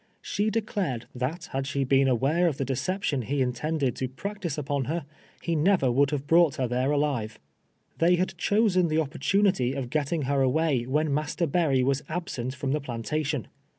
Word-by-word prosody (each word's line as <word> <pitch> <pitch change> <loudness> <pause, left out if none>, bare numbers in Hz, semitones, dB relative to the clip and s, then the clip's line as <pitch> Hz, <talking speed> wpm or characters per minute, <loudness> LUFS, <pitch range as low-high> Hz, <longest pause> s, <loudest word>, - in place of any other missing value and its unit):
Siie 210 +2 0
declared 200 - -2
that 130 +8 -4
had 135 0 -2
she 140 -1 -1
])L'im 135 +1 +3
awai'c 140 +8 +2
of 145 - -5
the 135 - -1
decej)tion 140 +1 -1
he 140 +3 -1
intended 130 +2 0
t(^ 130 +1 -5
practice 200 -2 -4
n})on 140 -2 -2
her, 160 0 -2 0.4
he 170 - 0
never 175 0 +3
Avoidd 135 +3 +3
have 145 -2 -3
hronght 165 -2 +4
lier 130 - 0
there 125 +3 0
alive. 135 -7 -1 0.6
They 175 +2 +5
had 185 +1 -1
chosen 185 -1 +2
tlie 155 +1 +2
opportunity 150 -2 +1
of 130 -3 -4
getting 155 +1 0
her 140 +1 +1
away 135 -2 +1
when 150 +4 +1
INIaster 150 +2 -1
Berry 140 -7 +2
was 135 +2 +1
ahsentfroni 135 -5 -3
the 150 +1 0
i>lantation. 145 +3 -2
145 Hz, 175 wpm, -27 LUFS, 130-170 Hz, 0.6 s, They